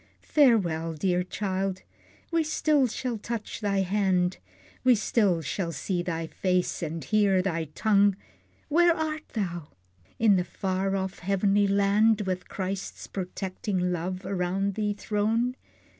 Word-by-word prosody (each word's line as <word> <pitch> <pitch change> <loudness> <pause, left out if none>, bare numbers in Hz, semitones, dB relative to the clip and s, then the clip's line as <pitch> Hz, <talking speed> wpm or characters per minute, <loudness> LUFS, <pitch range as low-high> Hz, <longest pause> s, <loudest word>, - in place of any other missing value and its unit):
Farewell, 180 - +3
dear 180 +3 +1
child! 190 0 -3 0.5
We 335 -1 +2
still 305 -3 +2
shall 240 0 -3
touch 230 0 -5
thy 200 -2 +1
hand, 190 -2 +1 0.5
We 255 -1 +6
still 200 -6 +1
shall 170 +3 -2
see 180 +1 -2
thy 165 -2 -3
face, 180 +2 -1
and 165 -1 -4
hear 200 -4 +3
thy 165 -4 -1
tongue. 205 -2 +4 0.5
Where 340 +2 +4
art 315 0 -3
thou? 175 -8 -3 0.5
In 215 -4 +5
the 180 - +1
far 190 +2 -2
off 190 -1 -3
heavenly 200 +2 +2
land, 200 +2 +3
With 185 -2 -3
Christ's 190 0 -4
protecting 185 0 -3
love 180 +2 -3
around 195 +1 -1
thee 210 0 -1
thrown? 220 +4 0
195 Hz, 130 wpm, -27 LUFS, 180-215 Hz, 0.5 s, We